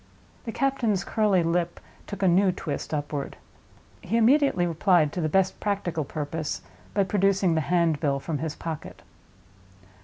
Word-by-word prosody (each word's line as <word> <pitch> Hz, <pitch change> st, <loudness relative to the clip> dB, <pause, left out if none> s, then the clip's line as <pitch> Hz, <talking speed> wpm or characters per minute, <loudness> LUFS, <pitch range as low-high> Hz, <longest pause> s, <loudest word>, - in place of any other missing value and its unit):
The 230 Hz, -, -3 dB
captain's 235 Hz, -7 st, 0 dB
curly 205 Hz, -5 st, +2 dB
lip 170 Hz, +1 st, -1 dB, 0.3 s
took 200 Hz, -1 st, -5 dB
a -, -, +5 dB
new 185 Hz, +2 st, +4 dB
twist 155 Hz, -5 st, -5 dB
upward. 145 Hz, -2 st, -3 dB, 0.6 s
He 230 Hz, -, -1 dB
immediately 250 Hz, -5 st, +4 dB
replied, 170 Hz, -2 st, +2 dB
to 180 Hz, -, -2 dB
the 155 Hz, -, 0 dB
best 190 Hz, +3 st, +1 dB
practical 180 Hz, -7 st, -2 dB
purpose, 150 Hz, +2 st, -4 dB, 0.3 s
by 200 Hz, -, +4 dB
producing 195 Hz, -2 st, +2 dB
the 160 Hz, -, +1 dB
handbill 155 Hz, -4 st, +1 dB
from 150 Hz, +1 st, -3 dB
his 155 Hz, 0 st, -3 dB
pocket. 160 Hz, -2 st, -7 dB
175 Hz, 145 wpm, -26 LUFS, 155-200 Hz, 0.6 s, a